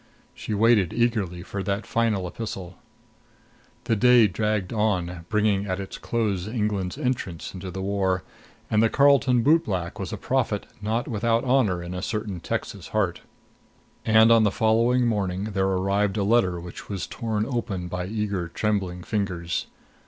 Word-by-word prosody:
She 105 - -4
waited 105 -4 +4
eagerly 105 -8 0
for 100 +1 -5
that 100 +2 -2
final 110 -5 0
epistle. 95 -2 -6 1.0
The 115 - +1
day 125 +1 +6
dragged 105 0 -1
on, 90 -6 -1
bringing 105 -2 +1
at 95 0 -2
its 95 - -7
close 105 -5 -1
England's 105 -5 -2
entrance 110 -10 -3
into 95 0 -6
the 95 +1 -5
war; 95 -2 0 0.5
and 110 -1 +4
the 115 - +4
Carlton 135 -3 +4
bootblack 105 - +1
was - - -4
a - - -4
prophet 125 -6 -1 0.2
not 110 +4 -1
without 115 +1 +1
honor 125 -10 +2
in 85 +1 -6
a 90 - -4
certain 105 -3 -3
Texas - - -4
heart. - - -1 0.8
And 110 +1 +6
on 115 -1 +7
the 105 - +4
following 115 +4 +2
morning 100 -2 -1
there 95 -1 +1
arrived 95 +2 +1
a 100 - +1
letter 100 -5 +2
which 90 +1 -10
was 100 -3 -3
torn 110 -3 -2
open 115 -8 -3
by 90 0 -4
eager 100 -4 -2
trembling 95 -2 -2
fingers. 90 -6 -2
105 Hz, 155 wpm, -25 LUFS, 95-115 Hz, 1.0 s, on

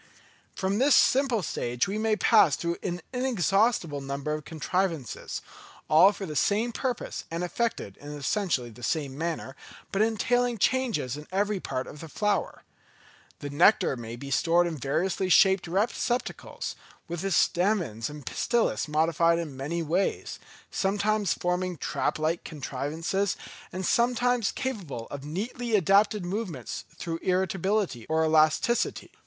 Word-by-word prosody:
From 195 +2 0
this 275 +2 +5
simple 255 -6 +3
stage 120 -3 -1
we 205 +2 -2
may 220 0 +2
pass 210 - +5
through 170 0 -2
an 175 -1 -3
inexhaustible 205 - +1
number 140 +2 -3
of 155 -1 -5
contrivances, 165 - -2 0.4
all 170 +6 +7
for 200 -1 -6
the 155 -4 -6
same 210 - +2
purpose 250 +1 -3
and 165 +2 -3
effected 180 - -2
in 145 +1 -9
essentially 145 - -1
the 110 - -14
same 140 +1 -1
manner, 160 -3 -3 0.4
but 195 - +1
entailing 235 +2 +1
changes 225 - 0
in 150 - -10
every 205 +1 0
part 130 -6 -3
of 150 - -10
the 165 - -9
flower. 205 +3 -1 0.8
The 145 - -5
nectar 175 +2 +4
may 115 -1 -7
be 140 +3 -8
stored 170 +5 +3
in 170 -2 -2
variously 175 +8 -1
shaped 190 0 +5
receptacles, 220 +6 -2 0.3
with 170 -1 -4
the 195 - -1
stamens 175 - +1
and 150 -2 -10
pistils 170 - 0
modified 165 +2 +2
in 160 -5 -4
many 155 +6 -3
ways, 175 +5 -1 0.3
sometimes 205 +1 +1
forming 180 0 -1
trap - - -1
like 160 +2 -1
contrivances, 160 +7 -2 0.3
and 185 0 -4
sometimes 245 0 +2
capable 185 - -4
of 140 -1 -6
neatly 225 - -2
adapted 200 +1 +3
movements 180 - -4
through 165 -1 -4
irritability 190 - 0
or 160 0 +2
elasticity. 155 +9 +2
175 Hz, 140 wpm, -27 LUFS, 150-210 Hz, 0.8 s, all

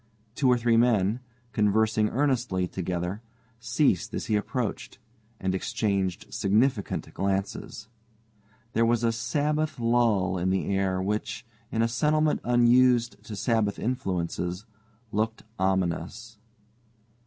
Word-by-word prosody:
Two 130 0 +2
or 125 - +4
three 115 -1 +2
men, 115 -2 +3 0.3
conversing 105 0 +2
earnestly 125 -9 0
together, 90 +2 -3 0.4
ceased 115 - +1
as - - -3
he 110 - 0
approached, 115 +2 -3 0.4
and 95 0 -1
exchanged 100 -2 -2
significant 105 +2 0
glances. 100 +2 -3 0.9
There 115 - +3
was 120 0 +2
a 115 - +3
Sabbath 150 +6 -1
lull 115 -6 +2
in 90 +2 0
the 95 0 0
air 95 -1 0
which, 105 +2 -3 0.3
in 115 - +1
a - - +3
settlement 150 +6 +1
unused 120 -2 +3
to 110 - -6
Sabbath 105 -1 0
influences, 90 -5 -2 0.5
looked 110 +2 -1 0.2
ominous. 95 +4 -1
110 Hz, 115 wpm, -27 LUFS, 95-120 Hz, 0.9 s, or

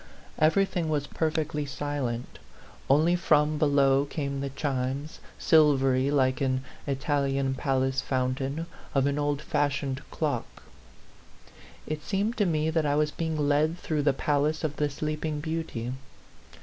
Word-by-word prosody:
Every 160 +6 +4
thing 175 -4 -2
was 145 -2 0
perfectly 155 -1 -1
silent; 135 -4 -4 0.5
only 155 +6 +4
from 150 -3 +2
be 155 - +4
low 140 -1 +4
came 140 -2 -3
the 140 - -2
chimes, 135 +1 -3 0.2
silvery 135 -4 +4
like 130 -2 +2
an 130 -1 0 0.2
Italian 135 -1 0
palace 130 -1 0
fountain, 135 +4 -1 0.3
of 135 -1 +3
an 140 +1 0
old 145 0 -1
fashioned 140 -2 -1
clock. - - -3 1.2
It 155 0 -4
seemed 205 +7 -1
to 205 -3 +2
me 155 -1 +1
that 160 -1 +1
I 145 - +2
was 150 0 +2
being 160 -1 -2
led 150 +3 +2
through 155 -4 -1
the 145 0 +3
palace 150 +3 0
of 150 -2 -2
the 150 -1 +1
Sleeping 150 +1 -3
Beauty. 155 -7 -3
145 Hz, 140 wpm, -27 LUFS, 135-155 Hz, 1.2 s, Every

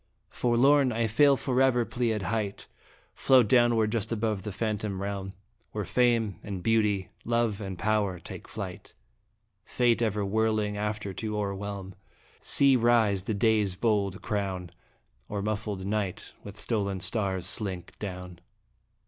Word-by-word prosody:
123 - - -13
Forlorn, 130 +3 +4
I 115 0 0
fail 140 +5 +4
forever 130 -2 +2
Pleiad 115 -5 -1
height 100 +1 -2 0.5
Float 130 -4 +4
downward 115 -2 +4
just 115 -2 -1
above 110 -3 -1
the 105 - -5
phantom 105 -1 -2
realm 100 -1 -4 0.4
Where 105 -2 -3
Fame 115 -2 +1
and 95 -3 -6
Beauty, 105 -3 +1
Love 115 -3 0
and 95 -2 -5
Power, 105 -3 0
take 85 - -10
flight, - - -7 0.7
Fate 120 +1 +1
ever 105 -3 0
whirling 110 0 0
after 105 -1 -3
to 105 +3 -4
o'erwhelm. 100 -1 -4 0.5
See 140 -1 +4
rise 115 -5 +3
the 110 - -1
Day's 105 -3 +2
bold 100 -3 0
crown, 95 -4 -3 0.6
Or 100 -1 -3
muffled 105 -2 -3
Night 100 -2 -2
with 100 0 -9
stolen 100 -4 -1
stars 95 -2 0
slink 95 -4 -3
down 90 -3 -7
105 Hz, 135 wpm, -28 LUFS, 100-115 Hz, 0.7 s, Forlorn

